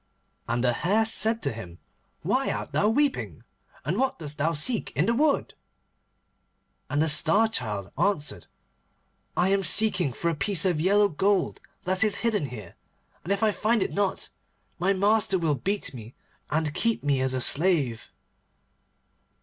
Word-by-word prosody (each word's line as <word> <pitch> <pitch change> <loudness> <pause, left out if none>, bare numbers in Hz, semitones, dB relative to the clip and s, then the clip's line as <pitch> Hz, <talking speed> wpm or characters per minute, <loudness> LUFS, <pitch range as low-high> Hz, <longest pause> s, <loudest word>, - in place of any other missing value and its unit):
And 120 +1 0
the 125 -1 +2
Hare 205 - +1
said 225 0 +1
to - - 0
him, 90 -7 -9 0.5
'Why - - 0
art - - -4
thou 210 - +2
weeping? 285 +4 -1 0.4
And - - -1
what 265 0 0
dost 150 -2 -7
thou 160 +3 +1
seek 220 +11 0
in 150 - +2
the 230 - +2
wood?' 290 +3 +1 1.4
And 145 +2 +1
the - - 0
Star 165 +8 +4
Child 105 - -4
answered, 165 -8 -1 0.9
'I 180 +2 +3
am 195 0 +2
seeking 180 -4 +2
for 170 +8 -1
a - - -3
piece 195 +2 0
of 175 -5 +1
yellow 205 +4 +4
gold 195 +2 0 0.2
that 185 +2 0
is 210 -2 +2
hidden 210 -10 +1
here, 110 -8 -9 0.5
and 180 - -4
if 200 +2 0
I 215 - +4
find 220 0 +1
it - - -4
not 200 -1 -1 0.5
my 185 +3 +2
master 200 0 +2
will 165 -4 +1
beat 190 - -2
me, 115 -1 -10 0.3
and 155 -1 -1
keep 230 +5 0
me 140 -2 +1
as 130 0 +1
a - - 0
slave. 140 -6 +1
180 Hz, 165 wpm, -26 LUFS, 145-210 Hz, 1.4 s, Star